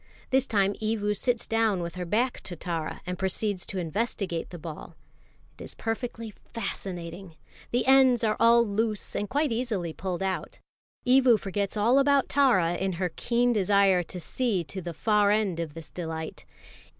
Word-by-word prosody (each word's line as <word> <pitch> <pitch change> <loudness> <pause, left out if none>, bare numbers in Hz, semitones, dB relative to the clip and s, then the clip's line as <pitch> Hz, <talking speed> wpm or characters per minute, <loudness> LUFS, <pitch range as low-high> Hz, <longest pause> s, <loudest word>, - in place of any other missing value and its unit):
This 265 0 +3
time 200 -3 +2
Evu 215 -1 0
sits 240 +3 0
down 225 -5 +1
with 170 0 -5
her 180 -1 -5
back 235 +8 0
to 175 - -5
Tara, 165 -1 -4
and 180 -1 -4
proceeds 190 0 -1
to 195 - -5
investigate 185 0 -2
the 175 - -8
ball. 160 -1 -9 0.6
It - - -7
is - - -6
perfectly 230 -1 -4
fascinating. 180 -5 -6 0.3
The 245 - 0
ends 260 -2 +5
are 215 -1 +2
all 235 0 +6
loose 215 0 -1
and 205 - -2
quite 290 +1 +1
easily 220 -8 -2
pulled 185 0 -3
out. 190 -1 -3 0.5
Evu 255 -2 +6
forgets 200 +1 -3
all 235 +6 +4
about 280 -1 +3
Tara 240 -12 +3
in 190 +1 -1
her 180 +1 -1
keen 240 +1 +1
desire 200 -2 +4
to 180 +1 -7
see 200 +2 -1
to 170 +5 -6
the 170 -1 -6
far 210 +1 +3
end 205 -5 +1
of 165 -3 -4
this 165 -2 -9
delight. 160 -2 -5
205 Hz, 170 wpm, -27 LUFS, 180-230 Hz, 0.6 s, all